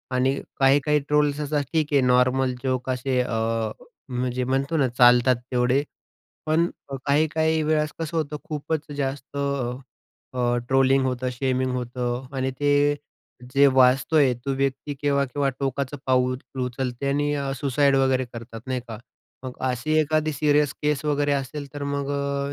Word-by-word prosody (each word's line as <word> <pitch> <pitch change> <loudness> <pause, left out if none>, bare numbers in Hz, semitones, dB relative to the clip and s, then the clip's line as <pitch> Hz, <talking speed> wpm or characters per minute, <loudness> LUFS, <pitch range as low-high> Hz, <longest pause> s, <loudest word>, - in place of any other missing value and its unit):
आणि 130 +2 +2 0.2
काही-काही 145 +2 +4
ट्रोल्स 150 -1 +2
असे 150 0 0
ठीक 155 -2 +2
आहे 140 - +5
नॉर्मल 125 +1 +3
जोक्स 130 -1 -1
असे 125 0 -1
अ, 115 -1 -1 0.4
म्हणजे 125 0 -2
म्हणतो 135 +5 0
ना 135 -4 +3
चालतात 125 +1 +5 0.2
तेवढे. 125 +2 +2 0.6
पण 160 +2 +3 0.4
काही-काही 160 +2 +2
वेळेस 155 0 +1
कसं 165 0 -4
होतं 150 -2 -1
की - - -13
खूपच 155 +1 -2
अ, - - -5
जास्त 140 0 -4 1.0
अ, 120 -1 +1
ट्रोलिंग 135 0 +3
होतं, 130 0 -2
शेमिंग 130 0 -1
होतं 125 0 -3
आणि 130 0 0
ते 145 - +2 0.8
जे 140 +1 +6
वाचतोय 130 +2 +4
तो 140 - -1
व्यती 135 +1 -2
केव्हा-केव्हा 140 -1 +1
टोकाचं 140 +1 -2
पाऊल 130 -1 +2 0.3
उचलते 125 +1 -4
आणि 145 +1 +1 0.3
सुसाईड 140 0 +2
वगैरे 130 -1 +2
करतात 115 -1 -9
नाही 130 -1 -2
का? 110 -2 -6 0.5
मग 130 - -5 0.2
अशी 125 +5 -1
एखादी 155 0 +1
सीरियस 145 -1 +2
केस 150 -1 0
वगैरे 145 -1 +1
असेल 140 +1 -3
तर 145 - -5
मग 140 0 -2
अ, 140 0 -2
135 Hz, 145 wpm, -24 LUFS, 125-145 Hz, 1.0 s, जे